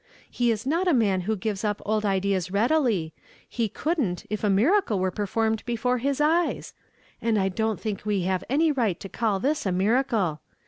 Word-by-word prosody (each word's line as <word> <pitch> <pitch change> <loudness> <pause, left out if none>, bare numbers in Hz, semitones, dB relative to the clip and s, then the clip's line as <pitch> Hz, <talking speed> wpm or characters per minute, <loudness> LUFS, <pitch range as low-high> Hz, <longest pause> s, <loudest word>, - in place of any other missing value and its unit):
He 240 -1 +1
is 225 0 -1
not 335 +7 +1
a 340 - +4
man 200 -6 +2
who 220 - +2
gives 210 0 -3
up 210 -1 -1
old 215 0 0
ideas 190 -2 0
readily; 215 - +1 0.3
he 230 -3 -2
couldn't 265 - -2
if 215 - -3
a 210 - +2
miracle 230 - +3
were 185 0 0
performed 220 +3 -1
before 250 +1 0
his 275 +3 -1
eyes; 325 +3 +1 0.5
and 230 -2 +1
I 195 -1 +1
don't 220 +2 -1
think 210 -3 -4
we 205 -3 0
have 185 0 -1
any 310 +4 +3
right 230 - 0
to - - -7
call 210 -1 -1
this 290 +8 0
a 190 - 0
miracle. 195 - +1
220 Hz, 190 wpm, -25 LUFS, 195-250 Hz, 0.5 s, a